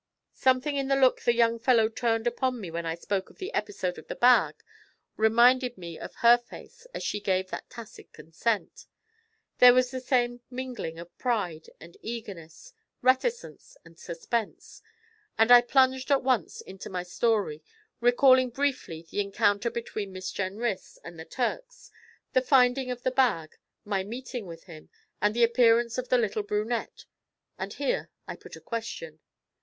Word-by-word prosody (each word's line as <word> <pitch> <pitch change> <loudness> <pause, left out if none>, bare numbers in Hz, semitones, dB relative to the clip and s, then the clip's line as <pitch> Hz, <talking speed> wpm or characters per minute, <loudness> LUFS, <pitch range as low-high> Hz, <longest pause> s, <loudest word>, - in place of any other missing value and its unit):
Something 260 +3 +1
in 275 -1 -1
the 275 - +2
look 260 -2 +3
the 240 - +2
young 230 0 +2
fellow 230 -2 +4
turned 225 0 -1
upon 250 +1 -1
me 185 -6 -7
when 170 0 -4
I 165 - -2
spoke 190 +2 -3
of - - -20
the 385 +4 -6
episode 185 - -3
of - - -15
the - - -5
bag 250 0 +4 0.5
reminded 245 +3 +4
me 170 -3 -8
of - - -9
her 240 +1 +8
face 455 - -14
as - - -6
she 210 - -2
gave 190 -2 -1
that - - -6
tacit 235 -3 -12
consent; 205 +7 -3 0.7
there 250 0 +9
was 255 -1 +2
the 260 - -4
same 245 -2 0
mingling 250 -10 -6
of 170 +1 -11
pride 195 -11 -2
and 170 +2 -14
eagerness, 200 -9 -8 0.3
reticence 360 - 0
and 165 0 -18
suspense, 210 +6 -5 0.6
and 225 +2 +4
I 245 0 +10
plunged 260 +1 +2
at 275 -2 +3
once 250 -10 0
into 190 0 -10
my 180 -2 -4
story, 195 -4 0 0.4
recalling 255 +2 +5
briefly 255 - -2
the 205 - -2
encounter 205 +2 +1
between 215 -4 -5
Miss 185 0 -5
Jenrys 200 +2 -3
and 170 -1 -10
the 160 - -8
Turks, - - -4 0.4
the 255 - +4
finding 255 0 +3
of 245 -1 -5
the 255 - +1
bag, 215 -12 +1 0.3
my 200 -2 -1
meeting 240 0 -7
with 165 -1 -10
him, 160 -4 -13 0.3
and 210 +2 +2
the 240 - +3
appearance 235 0 +3
of 255 - -5
the 250 - +4
little 220 -2 0
brunette, 210 +3 -3 0.5
and - - -5
here - - -2 0.2
I - - -6
put - - -12
a - - -11
question. 220 -9 -6
235 Hz, 165 wpm, -27 LUFS, 195-255 Hz, 0.7 s, I